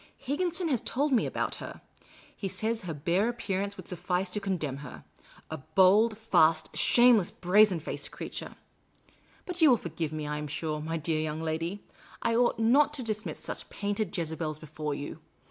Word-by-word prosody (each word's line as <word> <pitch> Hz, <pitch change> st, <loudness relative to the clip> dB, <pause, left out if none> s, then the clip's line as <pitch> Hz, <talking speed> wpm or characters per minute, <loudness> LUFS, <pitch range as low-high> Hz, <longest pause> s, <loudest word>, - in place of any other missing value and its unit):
Higginson 345 Hz, +5 st, -1 dB
has 255 Hz, -6 st, +1 dB
told 285 Hz, +4 st, 0 dB
me 240 Hz, -, +3 dB
about -, -, -2 dB
her. -, -, -8 dB, 0.6 s
He 195 Hz, -, -4 dB
says 220 Hz, +4 st, -2 dB
her 180 Hz, -4 st, -5 dB
bare 175 Hz, +9 st, +1 dB
appearance 200 Hz, -4 st, -3 dB
would 185 Hz, -, -9 dB
suffice 180 Hz, +1 st, -1 dB
to 210 Hz, -, -1 dB
condemn 175 Hz, -9 st, -2 dB
her 140 Hz, -2 st, -10 dB, 0.2 s
— -, -, -23 dB
a -, -, -3 dB
bold, 200 Hz, -, +4 dB
fast, 160 Hz, -7 st, +3 dB
shameless, 240 Hz, -6 st, +5 dB
brazen 195 Hz, -1 st, +4 dB
faced 155 Hz, -, -5 dB
creature. -, -, -7 dB, 0.9 s
But 360 Hz, -1 st, -3 dB
you 315 Hz, -, +8 dB
will 245 Hz, -, +6 dB
forgive 165 Hz, -4 st, -4 dB
me, 155 Hz, -1 st, -4 dB
I 150 Hz, 0 st, -3 dB
am 150 Hz, -, -4 dB
sure, 155 Hz, +1 st, -3 dB
my 165 Hz, +2 st, -2 dB
dear 155 Hz, 0 st, -1 dB
young 155 Hz, 0 st, -2 dB
lady; 165 Hz, +5 st, -3 dB, 0.4 s
I 230 Hz, 0 st, +2 dB
ought 240 Hz, 0 st, +3 dB
not 275 Hz, +7 st, +4 dB
to 265 Hz, -, -3 dB
discuss 215 Hz, -1 st, -3 dB
such -, -, -6 dB
painted 205 Hz, 0 st, -2 dB
Jezebels 160 Hz, -2 st, -3 dB
before 155 Hz, -1 st, -5 dB
you. 145 Hz, -, -6 dB
190 Hz, 180 wpm, -29 LUFS, 160-225 Hz, 0.9 s, you